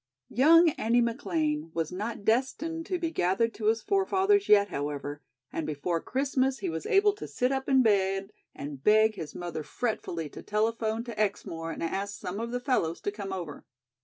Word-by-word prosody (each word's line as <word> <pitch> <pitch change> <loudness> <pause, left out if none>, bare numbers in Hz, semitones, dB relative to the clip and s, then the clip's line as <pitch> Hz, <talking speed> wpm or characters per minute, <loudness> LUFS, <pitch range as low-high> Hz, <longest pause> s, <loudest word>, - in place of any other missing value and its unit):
Young 330 +7 +6
Andy 230 +2 +3
McLean 165 -10 -1
was 165 -1 -1
not 205 +3 -5
destined 310 +8 0
to 365 - -1
be 335 -2 -2
gathered 195 - +1
to 215 - -3
his 225 0 +2
forefathers 390 +1 +2
yet, 205 -1 +6
however, 145 0 -4 0.3
and 160 - -3
before 160 +3 -2
Christmas 265 0 0
he - - -3
was 160 0 -4
able 405 +1 +4
to 415 - -8
sit 250 +1 0
up 265 0 -2
in 265 -1 +5
bed 195 -2 +1 0.2
and 140 -1 -7
beg 215 +1 +5
his 165 -7 -7
mother 175 -3 -4
fretfully 170 -4 -3
to - - -10
telephone 220 +1 -1
to 235 -3 -7
Exmoor 165 -5 -2
and 160 - -5
ask 200 +4 -3
some 180 +3 -5
of 230 +1 -3
the 245 +1 -2
fellows 245 - 0
to 205 - -2
come 200 -2 -6
over. 175 -6 -6
215 Hz, 185 wpm, -28 LUFS, 170-255 Hz, 0.3 s, Young